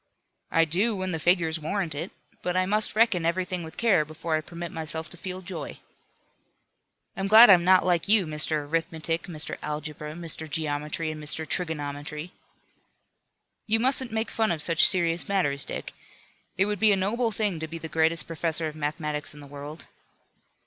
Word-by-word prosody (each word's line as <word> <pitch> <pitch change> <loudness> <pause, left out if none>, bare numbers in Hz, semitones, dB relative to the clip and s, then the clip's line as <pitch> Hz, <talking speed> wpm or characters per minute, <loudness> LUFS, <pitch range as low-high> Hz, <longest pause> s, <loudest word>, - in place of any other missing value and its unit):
"I 165 0 +3
do, 195 +8 +1
when 185 -1 -3
the 165 - -3
figures 165 -1 +2
warrant 165 +1 -2
it. 160 +6 -5 0.3
But 180 0 -2
I 185 - +2
must 210 +3 +1
reckon 220 -6 +3
everything 180 +1 -1
with 160 -1 -10
care 210 -9 +3
before 155 +1 -4
I 155 - 0
permit 170 +1 -8
myself 160 0 -4
to - - -10
feel 185 +2 -6
joy." 170 -6 -6 1.4
"I'm 195 +1 -2
glad 220 +2 +9
I'm 175 -2 +6
not 185 +1 +5
like 175 -1 +1
you, 205 -2 +5
Mr. 150 -1 -1
Arithmetic, 165 +1 -2
Mr. 160 -3 -4
Algebra, 150 0 -6
Mr. 160 -1 -3
Geometry 150 +1 -2
and 155 -1 -8
Mr. 155 +1 +1
Trigonometry." 150 -1 -3 1.4
"You 225 +1 +3
mustn't 260 0 +1
make 220 +1 -2
fun 220 -3 0
of 165 - -2
such 165 0 +6
serious 170 -2 +1
matters, 145 -8 0
Dick. - - -6 0.6
It 190 - +4
would 210 -1 -2
be 220 -1 +5
a 200 - +3
noble 225 +5 0
thing 210 -5 -1
to 160 - -4
be 165 +1 -6
the 165 - -7
greatest 160 +1 +3
professor 165 -1 -1
of 155 - -7
mathematics 150 0 -4
in - - -12
the 145 - -11
world." 145 +2 -9
165 Hz, 175 wpm, -26 LUFS, 155-185 Hz, 1.4 s, glad